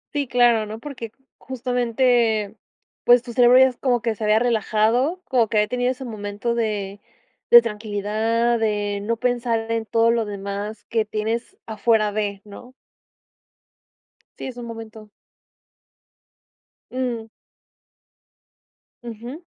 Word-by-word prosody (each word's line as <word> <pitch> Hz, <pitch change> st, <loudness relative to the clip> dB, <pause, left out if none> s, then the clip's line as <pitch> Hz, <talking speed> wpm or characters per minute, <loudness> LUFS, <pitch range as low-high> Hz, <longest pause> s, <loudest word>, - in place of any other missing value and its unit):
Sí, 285 Hz, -2 st, 0 dB
claro, 240 Hz, -3 st, +3 dB
¿no? 215 Hz, +1 st, -6 dB
Porque 240 Hz, -4 st, -8 dB, 0.3 s
justamente, 240 Hz, -4 st, 0 dB, 0.5 s
pues, 245 Hz, 0 st, +5 dB
tu 235 Hz, -, -8 dB
cerebro 245 Hz, +1 st, +6 dB
ya 260 Hz, -, +8 dB
es 250 Hz, -, -11 dB
como 245 Hz, -4 st, 0 dB
que 230 Hz, -1 st, 0 dB
se 220 Hz, -, -8 dB
había 215 Hz, 0 st, +4 dB
relajado, 235 Hz, -, +1 dB
como 245 Hz, -4 st, +2 dB
que 215 Hz, -, -1 dB
había 210 Hz, 0 st, +3 dB
tenido 245 Hz, +2 st, 0 dB
ese 260 Hz, +1 st, -7 dB
momento 210 Hz, 0 st, -4 dB
de 205 Hz, -4 st, -2 dB, 0.5 s
de 240 Hz, -, +10 dB
tranquilidad, 220 Hz, +2 st, -1 dB
de 205 Hz, -2 st, -1 dB
no 230 Hz, +3 st, -2 dB
pensar 235 Hz, -2 st, -1 dB
en 230 Hz, -1 st, -1 dB
todo 230 Hz, +1 st, +2 dB
lo 230 Hz, -1 st, 0 dB
demás 200 Hz, +1 st, -6 dB
que 225 Hz, -2 st, 0 dB
tienes 220 Hz, -, -3 dB
afuera 220 Hz, -1 st, +1 dB
de, 205 Hz, -1 st, -3 dB
¿no? 245 Hz, +5 st, -12 dB, 1.6 s
Sí, -, -, -7 dB
es 255 Hz, -2 st, -8 dB
un 240 Hz, -, -7 dB
momento. 225 Hz, -2 st, -9 dB, 1.8 s
Mm. 245 Hz, -3 st, -3 dB, 1.8 s
Ujú. 240 Hz, +7 st, -8 dB
230 Hz, 130 wpm, -22 LUFS, 215-245 Hz, 1.8 s, de